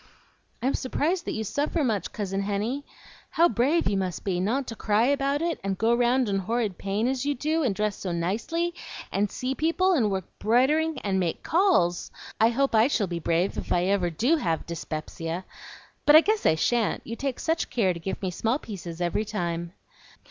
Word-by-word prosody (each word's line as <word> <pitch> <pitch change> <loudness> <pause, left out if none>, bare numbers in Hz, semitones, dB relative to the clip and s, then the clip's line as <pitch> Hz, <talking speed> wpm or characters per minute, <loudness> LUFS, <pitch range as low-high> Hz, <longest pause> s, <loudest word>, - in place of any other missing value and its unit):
"I'm 265 - +2
s'prised 325 +7 -1
that - - -2
you 220 - -2
suffer 295 - -1
much, 220 -7 -1
Cousin 195 -2 -3
Henny. 210 +8 -2 0.5
How 340 +1 +4
brave 300 +4 +2
you 200 - +1
must 185 -4 -3
be, 185 -3 -1
not 240 +9 0
to 225 - -6
cry 215 +1 +2
about 280 +2 +1
it, 335 -1 -1
and 195 -1 -2
go 225 +3 +2
round 245 +1 +2
in 195 -1 0
horrid 215 -1 -2
pain, 200 +4 -1
as 260 0 -1
you 285 0 0
do, 310 +5 0
and 240 -10 +1
dress 210 -1 -1
so 185 - -4
nicely, 225 - -1 0.4
and 205 +1 +1
see 255 +6 -3
people, 335 +6 +2
and 235 -11 +2
work 190 -2 -2
'broidering, 290 +8 +2
and 195 -2 0
make 175 -3 -2
calls! 320 - +2 0.3
I 225 - +5
hope 275 +3 +1
I 220 +2 +5
shall 235 -7 +1
be 170 -2 -4
brave 170 +3 0
if - - -8
I 175 - +3
ever 190 -2 +1
DO 245 - +2
have 165 - -1
'spepsia; 165 +1 -5 0.6
but 295 - +8
I 310 - +10
guess 430 +4 +1
I - - +4
shan't, 230 +7 0
you 230 - -5
take 270 0 -3
such 325 +1 -1
care 195 -7 +1
to 170 - -8
give 190 +4 -5
me 185 - -1
small 225 +8 0
pieces 180 - -8
every 175 +4 0
time." 170 -5 -3
220 Hz, 200 wpm, -26 LUFS, 190-275 Hz, 0.6 s, I